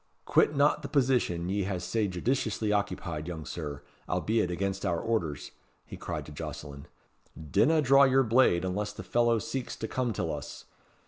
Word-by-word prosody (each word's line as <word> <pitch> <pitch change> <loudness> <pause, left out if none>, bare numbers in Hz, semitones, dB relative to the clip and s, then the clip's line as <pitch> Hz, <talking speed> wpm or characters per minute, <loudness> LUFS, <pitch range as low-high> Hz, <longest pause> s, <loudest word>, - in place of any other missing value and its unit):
Quit 150 - +3
not 145 +1 +3
the 140 - -5
position 125 - +1
ye 100 +1 0
hae 95 -1 -2
sae 105 +5 -1
judiciously 110 +2 -1
occupied, 85 -6 -2
young 80 -3 -6
Sir, 75 -5 -6 0.3
albeit 110 -4 +1
against 95 +2 -2
our 85 -1 0
orders," 85 - -2 0.3
he - - -9
cried - - -5
to - - -11
Jocelyn. 70 -1 -7 0.5
"Dinna 150 - +2
draw 135 +1 +6
your 135 0 +4
blade 115 -7 +3
unless 105 +3 -2
the - - -8
fellow 120 -1 +2
seeks 125 +4 -4
to 110 - -5
come 125 +1 -1
till 90 -6 -2
us. 75 -1 -7
105 Hz, 170 wpm, -29 LUFS, 85-125 Hz, 0.5 s, draw